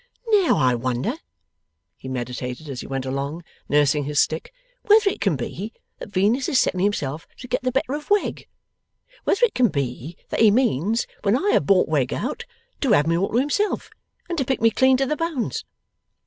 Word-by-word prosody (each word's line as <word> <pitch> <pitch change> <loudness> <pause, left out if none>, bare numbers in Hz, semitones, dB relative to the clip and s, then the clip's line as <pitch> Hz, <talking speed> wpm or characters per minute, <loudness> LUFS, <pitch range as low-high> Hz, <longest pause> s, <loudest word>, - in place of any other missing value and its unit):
'Now, 405 -5 +4
I 125 -1 +3
wonder,' 125 +1 -1 0.8
he - - -11
meditated 125 +2 -5
as 135 -3 -5
he - - -9
went 135 -1 -3
along, 140 +5 -3 0.3
nursing 145 0 +3
his 145 0 0
stick, 160 +1 0 0.3
'whether 425 0 +5
it - - -8
can 195 -7 +2
be, 190 - -5 0.3
that - - -8
Venus 210 +7 +1
is 260 - +3
setting 185 - +1
himself 165 -6 -1
to 250 - -9
get - - -1
the 255 0 -1
better 270 +2 -1
of 295 0 -5
Wegg? 410 0 0 0.8
Whether 475 +5 +4
it 455 - -4
can 250 -1 +3
be, 140 - -4
that - - -2
he 220 - +7
means, 220 - +1 0.2
when 205 +3 +2
I 405 +9 +1
have 140 - +2
bought 190 -2 +4
Wegg 140 -5 0
out, 465 - -4 0.3
to 265 -7 +2
have 145 - +4
me 165 +1 +1
all 190 +4 0
to 230 - 0
himself 295 +11 0 0.4
and 345 -2 -3
to - - +2
pick 265 +1 -1
me 225 0 +4
clean 260 +3 +4
to 270 - +1
the 300 - -1
bones! 325 -7 -3
200 Hz, 200 wpm, -23 LUFS, -, 0.8 s, he